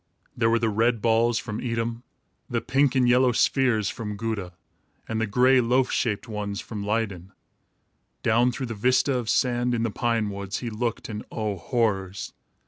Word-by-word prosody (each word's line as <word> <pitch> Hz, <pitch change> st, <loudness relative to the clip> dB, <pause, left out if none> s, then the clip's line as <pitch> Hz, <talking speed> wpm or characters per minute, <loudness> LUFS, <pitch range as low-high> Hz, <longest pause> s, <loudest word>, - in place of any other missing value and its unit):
There 115 Hz, -1 st, +2 dB
were 115 Hz, -, +3 dB
the 115 Hz, 0 st, 0 dB
red 115 Hz, +2 st, +2 dB
balls 115 Hz, +1 st, +2 dB
from 110 Hz, -2 st, -4 dB
Edam, 115 Hz, -1 st, -2 dB, 0.5 s
the 120 Hz, -2 st, 0 dB
pink 135 Hz, +2 st, +1 dB
and 125 Hz, -2 st, +4 dB
yellow 125 Hz, +1 st, +4 dB
spheres 120 Hz, -4 st, +2 dB
from 105 Hz, -2 st, -5 dB
Gouda, 105 Hz, -5 st, -3 dB, 0.5 s
and 110 Hz, 0 st, -2 dB
the 115 Hz, -, 0 dB
gray 125 Hz, +5 st, +4 dB
loaf 125 Hz, +2 st, +2 dB
shaped 110 Hz, 0 st, -1 dB
ones 105 Hz, -2 st, -4 dB
from 105 Hz, -3 st, -6 dB
Leyden. 100 Hz, -3 st, -2 dB, 0.9 s
Down 120 Hz, +3 st, +3 dB
through 130 Hz, +2 st, -4 dB
the 115 Hz, -, -5 dB
vista 125 Hz, +5 st, +2 dB
of 120 Hz, -3 st, -2 dB
sand, 120 Hz, -1 st, +1 dB
in 115 Hz, -, -1 dB
the 115 Hz, -, -1 dB
pine 115 Hz, -2 st, 0 dB
woods, 100 Hz, 0 st, -4 dB
he 120 Hz, -2 st, -5 dB
looked, 115 Hz, +2 st, -3 dB
and 105 Hz, -1 st, -5 dB
oh, 105 Hz, -3 st, -2 dB
horrors! 100 Hz, -2 st, -1 dB
115 Hz, 175 wpm, -25 LUFS, 105-120 Hz, 0.9 s, and